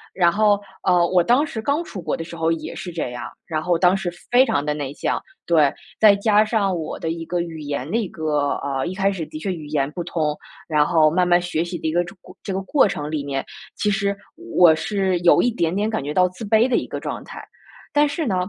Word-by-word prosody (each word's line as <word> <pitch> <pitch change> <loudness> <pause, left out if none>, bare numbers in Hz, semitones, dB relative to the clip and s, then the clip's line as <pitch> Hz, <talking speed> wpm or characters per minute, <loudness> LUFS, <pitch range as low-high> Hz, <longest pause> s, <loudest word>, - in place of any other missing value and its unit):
然 175 -2 +4
后， 205 +1 +3 0.2
呃， 180 -2 +4
我 180 -1 +3
当 250 - +3
时 235 -7 -5
刚 285 +7 0
出 205 - -8
国 - - -2
的 165 - -4
时 170 - -9
候 165 0 0
也 160 -1 -4
是 185 -1 -6
这 165 -6 -3
样， 120 -1 -6 0.2
然 155 -2 -2
后 175 0 +1
当 180 +2 +4
时 180 -2 -3 0.2
非 245 +1 +7
常 145 - 0
的 150 - 0
内 145 -3 -4
向， - - -2 0.2
对。 155 -5 +4 0.3
再 210 -2 +7
加 210 +1 +3
上 210 -4 0
我 160 - -5
的 160 - -3
一 165 0 -5
个 175 +1 -1
语 165 -2 -6
言 145 -1 -4
的 215 - 0
一 225 -4 -1
个 150 -3 -1
呃， 135 -2 -2
一 180 - -3
开 195 +1 +1
始 180 -4 -4
的 - - -8
确 190 +4 -2
语 160 -4 -8
言 145 -1 -1
不 175 - -5
通。 155 -3 -1 0.3
然 150 -3 +3
后 160 -2 +4
慢 180 +1 +2
慢 175 0 +5
学 170 -2 -1
习 175 +1 -5
的 - - -3
一 - - 0
个 175 +2 +2
这 175 +2 -10
个 - - -46 0.2
这 - - -4
个 190 - -2
过 265 +3 +3
程 150 -5 -4
里 150 -2 -2
面， 135 -1 -3 0.3
其 210 - 0
实 200 0 0 0.4
我 170 -3 +7
是 190 +2 0
有 175 0 +5
一 245 - +2
点 170 -6 -1
点 205 +2 0
感 220 -9 -2
觉 145 - -4
到 180 +3 +4
自 185 +5 -10
卑 220 +3 +4
的 255 - +2
一 - - -2
个 - - -5
状 - - -5
态。 - - -10 0.5
但 295 0 +4
是 320 +3 -3
呢， 195 - 0
175 Hz, 280 characters per minute, -22 LUFS, 155-200 Hz, 0.5 s, 非